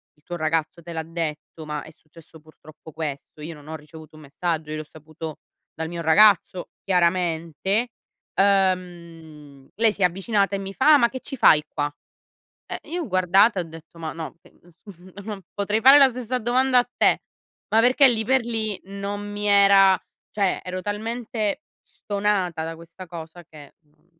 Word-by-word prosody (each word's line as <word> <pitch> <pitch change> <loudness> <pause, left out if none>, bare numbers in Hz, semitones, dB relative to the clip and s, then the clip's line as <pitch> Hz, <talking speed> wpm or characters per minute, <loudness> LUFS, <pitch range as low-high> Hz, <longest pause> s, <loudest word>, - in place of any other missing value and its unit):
il 150 - -33
tuo 175 - -6
ragazzo 160 +1 -1
te 170 +1 -9
l'ha 160 - -3
detto, 160 -1 -6
ma 150 -1 -4
è 160 - -13
successo 160 +1 -18
purtroppo 155 0 -16
questo". 150 -1 -6
Io 160 +2 -6
non 150 0 -15
ho 160 - -6
ricevuto 155 +1 -13
un 155 - -13
messaggio. 155 +2 -3
Io 155 - -3
l'ho 155 - -5
saputo 155 +1 -9 0.4
dal 160 0 -5
mio 170 0 -5
ragazzo 185 +1 +4
chiaramente. 180 - 0 0.5
Uhm, 170 -7 -1
lei 225 0 +3
si 205 - -10
è - - +7
avvicinata 195 +2 0
e - - -3
mi 195 0 -6
fa: 300 +8 +5
"Ah - - +8
ma 235 -4 +3
che 260 - -6
ci 275 - -7
fai 155 - +5
qua?" 145 0 -3 0.8
Eh, - - -5
io 350 +2 -3
ho - - -7
guardata 190 +2 +3
e - - -1
ho - - -12
detto: 165 +1 -14
"Ma 160 -1 -5
no, 165 0 -7
che - - -20
mhmm, 175 +1 -17
non 210 -3 -6
potrei 205 +2 -1
fare 270 +3 +9
la 275 -2 +8
stessa 250 0 -3
domanda 250 +2 +2
a 245 0 -1
te". - - +3 0.5
Ma 225 +1 +4
perché 255 +3 +5
lì 230 -3 +1
per 260 0 +2
lì 220 -4 -2
non 200 +1 -5
mi 205 0 -4
era 200 -1 +6 0.3
cioè 200 -3 0
ero 185 0 -5
talmente 220 +3 -3 0.4
stonata 200 -5 -1
da 165 0 -5
questa 170 +3 -12
cosa 170 0 -9
che 150 -2 -15
non 150 +2 -35
180 Hz, 185 wpm, -23 LUFS, 160-210 Hz, 0.8 s, fare